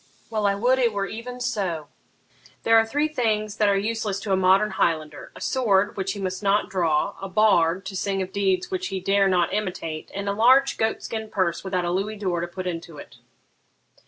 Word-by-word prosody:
Well, 215 -2 +1
I 200 - +2
would 250 +6 +2
it 235 -3 +2
were 200 -1 -1
even 240 +4 -7
so: 190 -11 -2 0.8
there 225 - +4
are 225 0 +5
three 290 +6 +1
things 220 -7 -1
that 210 -1 +3
are 200 - +3
useless 210 -1 -2
to 200 - -4
a - - +4
modern 190 +3 +3
Highlander, 155 -5 -1
a - - -11
sword 205 -6 +1
which 190 -1 -2
he 200 - -7
must 185 0 -3
not 205 +1 +1
draw, 165 -5 +1
a 195 - -5
bard 190 -3 +3
to 195 - -6
sing 195 +1 -1
of 190 0 -4
deeds 190 -2 0
which 185 0 -2
he 190 0 -3
dare 195 +1 +2
not 180 -2 +1
imitate, 180 -6 -3
and 200 0 -4
a 200 - +1
large 260 +6 +4
goat 220 0 0
skin 220 -1 -5
purse 180 -5 -1
without 185 -2 -1
a 175 - -1
louis 200 +4 -2
d'or 185 -4 -1
to 170 - -3
put 185 +1 -7
into 165 -3 -5
it.' - - -12
195 Hz, 215 wpm, -24 LUFS, 185-215 Hz, 0.8 s, are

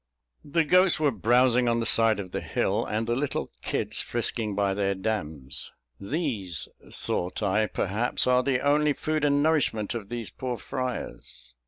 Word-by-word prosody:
The 160 +3 +1
goats 180 +1 +5
were 150 -2 +3
browsing 125 +3 +3
on 115 0 +2
the 115 - -1
side 115 -1 +4
of 95 -3 -6
the - - -3
hill, - - -1
and 110 +2 -1
the 120 +1 0
little 140 +2 -2
kids - - -1
frisking 115 -3 -2
by 100 -1 +1
their 100 0 0
dams. 80 -10 -3 0.3
"These," 110 - -2 0.2
thought 90 +4 -3
I, 105 +2 +2
"perhaps 105 +6 0
are 125 0 +4
the 130 -1 0
only 145 +1 +3
food 155 +1 -2
and 145 0 +3
nourishment 140 -10 +1
of 110 -4 -6
these 120 -3 -5
poor 125 -2 -4
friars." 130 0 -6
120 Hz, 165 wpm, -27 LUFS, 105-140 Hz, 0.3 s, goats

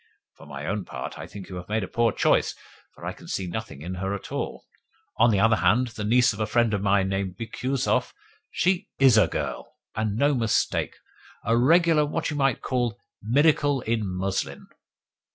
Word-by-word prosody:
For - - -15
my 70 0 -7
own 100 +3 -2
part, - - -7
I - - -7
think 100 -2 -10
you 90 - -7
have 90 +1 -9
made 110 0 0
a - - -4
poor 115 +3 +1
choice, - - +2 0.4
for - - -11
I - - -3
can - - -15
see 95 - -2
nothing 90 -5 -6
in 90 +3 -5
her 95 +1 -1
at 100 - -9
all. - - -4 0.5
On 115 +2 +5
the 100 -3 +2
other 110 +1 +4
hand, 105 +9 +2
the 110 -2 -6
niece 125 +3 +4
of 105 - -10
a 110 - 0
friend 115 0 +2
of 100 - 0
mine 100 -1 +2
named 95 -1 -2
Bikusov 125 +4 -1 0.4
she 180 0 0
IS 135 -4 +6
a 110 - +5
girl, - - -5 0.2
and 110 -2 -1
no 145 +5 +3
mistake! 115 -4 0 0.5
A 115 - +3
regular 160 +5 +4
what 155 +2 -2
you - - -3
might 135 -4 +1
call 120 -3 -1 0.2
'miracle 145 +3 +3
in 115 -1 -1
muslin! 95 +1 -3
110 Hz, 195 wpm, -25 LUFS, 100-130 Hz, 0.5 s, IS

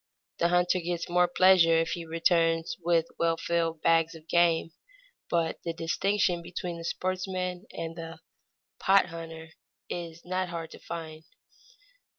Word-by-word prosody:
The 170 - +4
hunter 180 +1 +2
gets 170 0 -3
more 180 0 +4
pleasure 175 -2 +5
if 165 0 +1
he 170 -1 -4
returns 165 +3 +1
with 165 -1 +3
well 165 0 +2
filled 165 -1 -1
bags 165 0 +3
of 160 0 -14
game, 170 -1 +3 0.6
but 165 -2 0
the 170 - -2
distinction 175 +2 0
between 175 0 -5
the - - -7
sportsman 185 +1 -3
and 165 0 -5
the 165 0 -7 0.6
"pot 195 0 +5
hunter" 165 -1 -8 0.4
is 170 -1 -6
not 185 0 -1
hard 165 -2 -5
to - - -11
find. 160 -2 -7
170 Hz, 145 wpm, -28 LUFS, 165-180 Hz, 0.6 s, pleasure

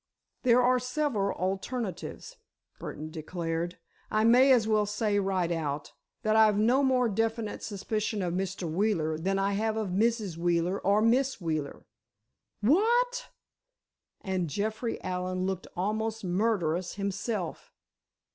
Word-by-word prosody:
"There 250 -1 +4
are 250 +1 +4
several 250 -5 -1
alternatives," 195 - -4 0.4
Burdon 155 +1 -6
declared; 165 +1 -3 0.3
"I 215 0 +2
may 250 +4 +6
as 235 -4 +4
well 215 -1 +2
say 210 0 0
right 190 -3 0
out, 150 -3 -3 0.3
that 215 0 +2
I've 215 -2 +5
no 240 +6 +4
more 255 -2 +3
definite 225 0 -1
suspicion 210 0 -2
of 175 -1 -1
Mr. 185 -1 -2
Wheeler 160 -3 0
than 195 +4 0
I 195 +1 +1
have 220 +2 0
of 215 -3 -1
Mrs. 210 -2 0
Wheeler 175 +2 +1
or 205 +2 +2
Miss 255 +3 +2
Wheeler." 155 -5 -3 0.8
"What!" 480 - +2 0.9
and 185 -4 -2
Jeffrey 220 - -2
Allen 185 0 -2
looked 190 -1 -3
almost 220 +3 -1
murderous 180 -3 0
himself. 200 -2 -3
205 Hz, 130 wpm, -29 LUFS, 180-225 Hz, 0.9 s, may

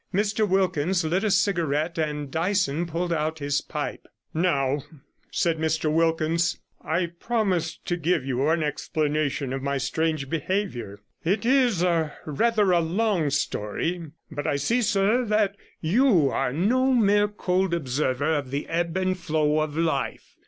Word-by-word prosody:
Mr 205 +2 +1
Wilkins 185 -2 +1
lit 180 +6 0
a 215 - +2
cigarette, 170 -5 +1
and 150 -3 -2
Dyson 175 -1 0
pulled 170 +1 -2
out 160 0 -1
his 145 -1 -1
pipe. - - -5 0.3
'Now,' 145 -5 +1 0.5
said 165 -2 0
Mr 160 -1 0
Wilkins, 165 +1 +1 0.3
'I 170 +1 -1
promised 195 -8 -1
to 175 - -1
give 165 -4 0
you 135 +2 0
an 165 0 +2
explanation 150 -2 -1
of 135 - -3
my 140 +1 -1
strange 155 +1 -1
behaviour. 160 - -3 0.2
It 200 +6 0
is 245 -8 +3 0.4
rather 210 +6 +2
a 175 - +4
long 175 -1 +1
story, 145 - -2 0.2
but 145 0 -4
I 150 - +1
see, 230 - +1
sir, 215 +2 +2
that 210 -2 +1 0.3
you 175 - +3
are - - 0
no 250 - +2
mere 205 -3 +4
cold 190 -3 0
observer 145 -1 0
of 145 -4 -2
the 140 +2 -3
ebb 170 +1 -1
and 185 0 +1
flow 155 -4 +1
of 155 0 -2
life. 160 -5 -2
165 Hz, 145 wpm, -25 LUFS, 150-195 Hz, 0.5 s, a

